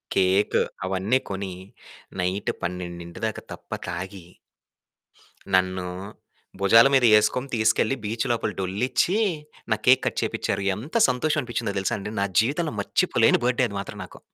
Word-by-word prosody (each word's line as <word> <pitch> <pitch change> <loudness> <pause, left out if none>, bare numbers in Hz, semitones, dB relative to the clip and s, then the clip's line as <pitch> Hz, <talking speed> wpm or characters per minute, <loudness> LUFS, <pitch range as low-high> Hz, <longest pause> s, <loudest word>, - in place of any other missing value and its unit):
Cake 95 +2 +3 0.3
అవన్నీ 95 +7 +1
కొని 95 -1 -4 0.7
night 95 +3 -1
12 85 -1 -5
దాకా 110 - -6
తప్ప - - -14 0.2
తాగి... 90 +1 -6 1.3
నన్ను 95 0 +1 0.7
భుజాల 115 +6 +7
మీద 130 -3 +5
ఏసుకొని 125 +5 +1
తీసుకెళ్ళి 110 +4 +2
బీచ్ 110 +3 -2
లోపల 115 - -1
డొలిచ్చి 125 - 0 0.5
నా - - +5
కేక్ 130 +1 +6
కట్ - - -1
చేపించారు. 100 - -2
ఎంత 130 - -9
సంతోషం 150 +5 0
అనిపించిందో 120 -4 -3
తెలుసా 95 - -1
అండి? 100 +1 -6
నా - - +2 0.2
జీవితంలో 150 +6 -1
మర్చిపోలేని 100 - +2
బర్త్‌డే 125 +1 +2
అది 100 - -8
మాత్రం 100 - -7
నాకు. - - -13
105 Hz, 135 wpm, -24 LUFS, 95-125 Hz, 1.3 s, భుజాల